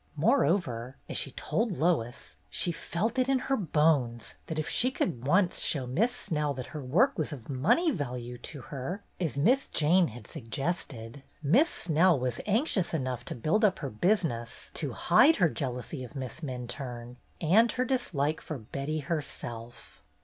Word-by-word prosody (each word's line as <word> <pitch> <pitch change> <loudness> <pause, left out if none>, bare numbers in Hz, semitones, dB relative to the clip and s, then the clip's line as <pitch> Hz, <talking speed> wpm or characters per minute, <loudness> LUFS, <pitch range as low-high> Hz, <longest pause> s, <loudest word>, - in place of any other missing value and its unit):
Moreover, 140 - +1
as - - -6
she - - -1
told 225 +1 -1
Lois, 150 -8 0
she 175 - 0
''felt 215 +11 -2
it 255 +1 +2
in 270 - +4
her 270 +1 0
bones 150 - +1
'' - - -36
that 160 - -4
if 155 - -1
she 250 - +2
could 165 - -2
once 180 +3 +3
show 135 -4 0
Miss 190 - +1
Snell 150 - -1
that 130 -1 -5
her 150 - -4
work 180 - +3
was 155 - -1
of 135 -4 -7
money 235 - +3
value 125 - -4
to 145 -4 -7
her, 160 - -5 0.2
as 160 -7 -2
Miss 245 - +3
Jane 170 +3 +4
had 120 -1 -10
suggested. 130 - -4 0.2
Miss 250 - +5
Snell 170 0 +3
was 125 -2 -2
anxious 210 - +1
enough 130 -4 -2
to - - -5
build 160 - +1
up 200 -3 +4
her 140 -4 -5
business 145 - -1
to - - -3
hide 320 - +5
her 175 -4 +3
jealousy 130 -1 -4
of 125 - -10
Miss 130 +2 -5
Minturne 125 -3 -6 0.2
and 210 +9 +4
her 255 - 0
dislike 160 - 0
for 155 - -5
Betty 140 +7 -4
herself. 120 - -6
150 Hz, 170 wpm, -29 LUFS, 125-185 Hz, 0.2 s, Miss